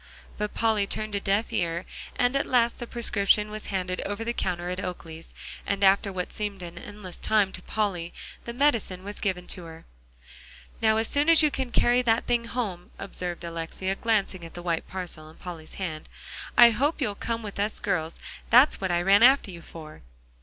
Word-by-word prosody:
But 210 0 -4
Polly 220 -3 +2
turned 215 +1 -2
a 200 - 0
deaf 200 +3 0
ear, 170 0 -1 0.3
and 245 +2 +2
at 275 - +1
last 235 -2 +2
the 240 - -5
prescription 210 -3 +1
was 215 0 -6
handed 185 -2 -2
over 205 +2 -3
the 235 +1 -2
counter 175 -4 -2
at 180 - -4
Oakley's, 165 -2 -7 0.3
and 200 0 -1
after 195 +1 +4
what 180 -1 -4
seemed 205 -3 -4
an 170 -1 -8
endless 205 -2 -8
time 210 -3 +2
to 185 - -3
Polly, 180 -5 -2 0.3
the 235 - -4
medicine 235 -8 +1
was 205 +1 -6
given 185 -3 -1
to 180 -3 -1
her. 165 0 -11 1.0
"Now 220 -1 +4
as 225 0 +1
soon 290 +3 +2
as 330 -1 +7
you 300 - +4
carry 245 -2 +2
that 230 -2 +2
thing 240 -1 +1
home," 205 -8 -4
observed 180 -3 -5
Alexia, 170 +3 -3
glancing 200 -4 0
at 165 - -10
the 175 - -7
white 170 -2 -1
parcel 175 -4 -6
in 160 - -15
Polly's 165 -3 -9
hand, 160 -5 -5 0.5
"I 240 -1 +9
hope 285 +9 0
you'll 245 -8 0
come 230 +3 -3
with 205 -1 -7
us 210 +2 -1
girls. 175 -7 -2 0.3
That's 250 +2 +6
what 190 -2 0
I 175 0 +1
ran 200 +3 +5
after 255 -4 +6
you 170 -1 -10
for." 155 -2 -11
200 Hz, 195 wpm, -27 LUFS, 180-230 Hz, 1.0 s, I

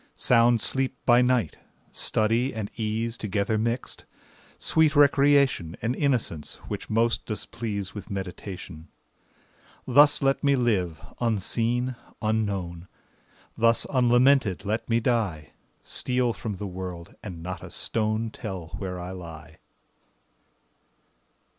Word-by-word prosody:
Sound 120 -1 +4
sleep 130 +1 0
by 120 0 +6
night; 125 - +1 0.3
study 115 +4 +1
and 105 -2 -4
ease 115 +1 -2
Together 105 +1 -1
mixed; 115 +3 -2 0.5
sweet 160 -2 +3
recreation, 140 - +4
And 115 +3 -1
innocence, 120 - -1
which - - -5
most 115 +2 +1
does 110 -2 -4
please 100 -5 -4
With 105 -3 -8
meditation. 95 -3 -7 1.0
Thus 145 +3 +5
let 135 +2 +2
me 140 -1 +4
live, 100 -10 0 0.2
unseen, 120 +3 0 0.2
unknown; 100 -6 -2 0.7
Thus 115 0 +3
unlamented 120 -5 +3
let 110 +3 -2
me 115 0 +3
die; 110 -11 -1 0.3
Steal 125 -2 +2
from 110 -2 -5
the 100 +2 -6
world, 90 -2 -7
and 85 -6 -8
not 90 +1 -6
a - - -8
stone 110 0 -1
Tell 95 -9 -7
where 90 -2 -4
I 90 +1 -6
lie. 80 -4 -10
110 Hz, 115 wpm, -26 LUFS, 95-125 Hz, 1.0 s, by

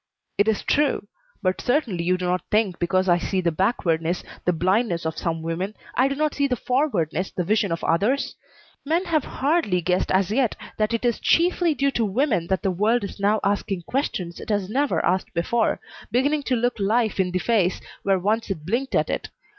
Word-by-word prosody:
"It 205 - +4
is 220 -2 +1
true, 285 -8 +1 0.4
but 185 0 0
certainly 245 - 0
you 185 +1 +2
do 180 - -3
not 180 +1 0
think 210 -4 +1
because 185 +2 +1
I 175 -1 +4
see 190 +2 -1
the 170 -2 +1
backwardness, 170 -2 0 0.2
the 180 - +4
blindness 180 +1 +1
of 160 0 -2
some 165 -1 -2
women, 180 +6 -3 0.2
I 260 - +3
do 275 - -2
not 305 0 0
see 280 -1 +1
the 250 - 0
forwardness, 205 - 0
the 180 - -3
vision 210 +1 +1
of 165 - -3
others? 210 +12 +1 0.5
Men 330 +6 0
have 315 -5 +1
hardly 275 - 0
guessed 180 +1 0
as 190 +1 +2
yet 245 0 +1 0.2
that 215 +1 +1
it 230 - -3
is 240 -2 +1
chiefly 345 -1 +2
due 275 +1 +1
to 235 - 0
women 215 - +1
that 190 +1 -1
the 195 - +1
world 215 +6 +1
is 200 - -6
now 205 +2 +2
asking 200 -2 -1
questions 195 - -2
it - - -9
has 205 -2 -1
never 280 +4 +1
asked 185 +1 0
before, 220 +7 +1 0.3
beginning 280 +6 +1
to 255 - +3
look 245 -1 0
life 220 +2 +1
in 185 -1 +2
the 180 - -1
face 190 -3 +1 0.2
where 195 -1 +2
once 215 +5 0
it 160 -6 -4
blinked 245 +8 -1
at - - +2
it. - - -3
205 Hz, 205 wpm, -24 LUFS, 180-250 Hz, 0.5 s, It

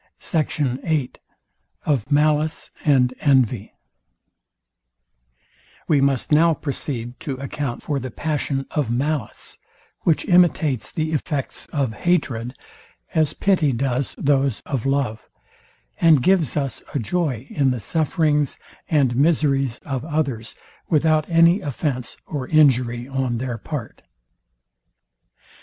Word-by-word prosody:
SECT. 145 -5 -1
VIII 150 -6 0 0.7
OF 140 -3 0
MALICE 150 +1 +1
AND 130 -4 +3
ENVY 125 -6 +2 2.2
We 145 -4 +3
must 135 -1 +1
now 160 +2 +5
proceed 130 -4 -4
to 140 - -4
account 140 -1 -4
for 145 -2 -1
the 130 0 -5
passion 140 0 -2
of 145 -6 -1
malice, 135 0 -3 0.4
which 160 - +1
imitates 165 - +3
the 155 0 -2
effects 145 -2 -3
of 135 -6 -1
hatred, 125 -5 -1 0.6
as 155 -2 +2
pity 175 -8 +2
does 130 +1 -1
those 140 -4 +1
of 135 -2 -3
love; 135 -5 -1 0.7
and 160 -6 +5
gives 180 -8 +2
us 135 -9 -2
a - - +3
joy 135 -1 -1
in 140 -3 +2
the 125 -1 -1
sufferings 150 - 0 0.3
and 135 -6 +2
miseries 140 -4 +2
of 135 -4 -3
others, 145 -8 -2 0.3
without 155 0 +2
any 170 +3 +5
offence 135 -3 -3
or 140 -4 -4
injury 125 -5 +3
on 135 -3 -1
their 120 -1 -4
part. 135 -2 -6
140 Hz, 115 wpm, -22 LUFS, 125-155 Hz, 2.2 s, now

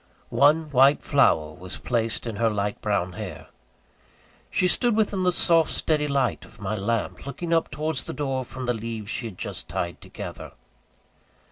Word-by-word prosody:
One 150 +2 +4
white 135 +2 +5
flower 80 - +3
was 90 +2 -8
placed 115 -2 -1
in 115 -3 -4
her 115 +1 +3
light 105 -1 -2
brown 100 -4 0
hair. 100 -7 -7 1.0
She 180 - +2
stood 240 +5 +3
within 210 -3 +1
the 180 0 +3
soft 165 -2 +4
steady 150 -2 +1
light 135 -3 0
of 115 - -16
my 100 +1 -2
lamp, 115 +5 -2
looking 170 +4 -3
up 165 -1 +2
towards 150 -2 -2
the - - -4
door 135 -3 -2
from 130 +1 -7
the 125 - +1
leaves 115 -2 -5
she 120 - -2
had 95 -5 -10
just - - -3
tied 85 0 -3
together. - - -8
125 Hz, 170 wpm, -25 LUFS, 105-150 Hz, 1.0 s, white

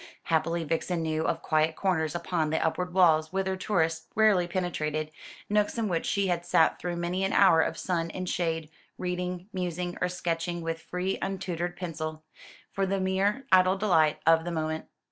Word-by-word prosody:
Happily 165 +1 0
Vixen 165 +2 -1
knew 160 0 -1
of - - -1
quiet 155 0 +2
corners 160 -5 0
upon 170 -2 -1
the 160 - 0
upward 180 +3 -1
walls 160 -4 +4
whither 190 0 -1
tourists 165 -4 0
rarely 210 -5 +4
penetrated; 155 -4 -2 0.4
nooks 210 +2 +1
in 225 -2 0
which 170 -4 -1
she 200 -1 +1
had 175 -2 0
sat 170 -2 +3
through 175 -1 -3
many 175 +2 -2
an 195 - 0
hour 165 -5 +6
of 160 - -1
sun 170 -2 -1
and 185 +2 -5
shade, 165 -3 -2 0.3
reading, 180 0 -3
musing, 180 -1 -3
or 180 - +1
sketching 170 -1 -2
with 165 0 -3
free 180 +3 -3
untutored 175 -2 -3
pencil, 155 -3 -5 0.5
for 195 0 -1
the 195 +1 0
mere 195 +7 0
idle 185 +1 +5
delight 165 -7 +3
of 165 0 +5
the 175 - -4
moment. 160 -1 -3
175 Hz, 175 wpm, -28 LUFS, 160-185 Hz, 0.5 s, hour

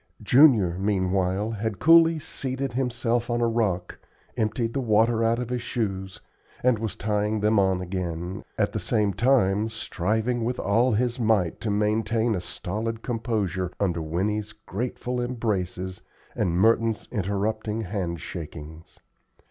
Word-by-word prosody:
Junior, 115 - +5
meanwhile, 95 +1 0
had 110 -1 -3
coolly 165 0 +6
seated 135 -3 -4
himself 120 -2 0
on 120 0 0
a 120 - +2
rock, 100 -6 -1 0.4
emptied 115 0 -1
the - - -1
water 115 0 +3
out 115 +1 +2
of 120 -1 -4
his 125 -1 -1
shoes, 95 -5 -3 0.4
and 125 -3 +3
was 110 -3 -3
tying 105 0 0
them 105 0 +3
on 95 -2 +2
again, 90 -1 -4
at - - +1
the - - -1
same 105 -2 +1
time 110 -4 +2
striving 110 +2 -1
with 125 +2 -2
all 115 +5 +2
his 120 +3 0
might 110 -7 +1
to 115 - -2
maintain 110 +2 +1
a 95 - -2
stolid 110 +6 -4
composure 105 -7 -2
under 85 -5 0
Winnie's 105 +7 -2
grateful 125 +4 -4
embraces 95 -7 -2 0.3
and 85 -1 0
Merton's 115 +2 +2
interrupting 105 +1 -1
hand 90 -5 -3
shakings. 80 -1 -9
110 Hz, 140 wpm, -25 LUFS, 95-115 Hz, 0.4 s, coolly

